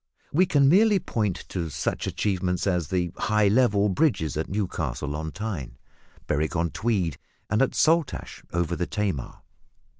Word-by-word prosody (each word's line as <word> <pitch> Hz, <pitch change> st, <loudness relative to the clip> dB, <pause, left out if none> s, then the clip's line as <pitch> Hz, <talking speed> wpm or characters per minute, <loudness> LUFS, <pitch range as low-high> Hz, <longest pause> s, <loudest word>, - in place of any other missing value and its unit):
We 180 Hz, +5 st, +4 dB
can 145 Hz, -6 st, +4 dB
merely 205 Hz, +6 st, +5 dB
point 105 Hz, -, -2 dB
to 85 Hz, -3 st, -3 dB
such 70 Hz, -, -2 dB
achievements 90 Hz, -3 st, -1 dB
as 90 Hz, -5 st, 0 dB
the 90 Hz, 0 st, -1 dB
high 105 Hz, -1 st, +2 dB
level 105 Hz, -3 st, +3 dB
bridges 95 Hz, -, +1 dB
at 80 Hz, +1 st, -2 dB
Newcastle 80 Hz, -, -2 dB
on 80 Hz, +1 st, -4 dB
Tyne, 95 Hz, -, -5 dB, 0.5 s
Berwick 80 Hz, +4 st, -1 dB
on 85 Hz, -1 st, 0 dB
Tweed, 95 Hz, -, -1 dB, 0.3 s
and 105 Hz, +3 st, +3 dB
at 135 Hz, -, +1 dB
Saltash, 160 Hz, -4 st, +1 dB
over 85 Hz, 0 st, 0 dB
the 90 Hz, -, -2 dB
Tamar. 100 Hz, -, -3 dB
95 Hz, 150 wpm, -26 LUFS, 80-110 Hz, 0.5 s, merely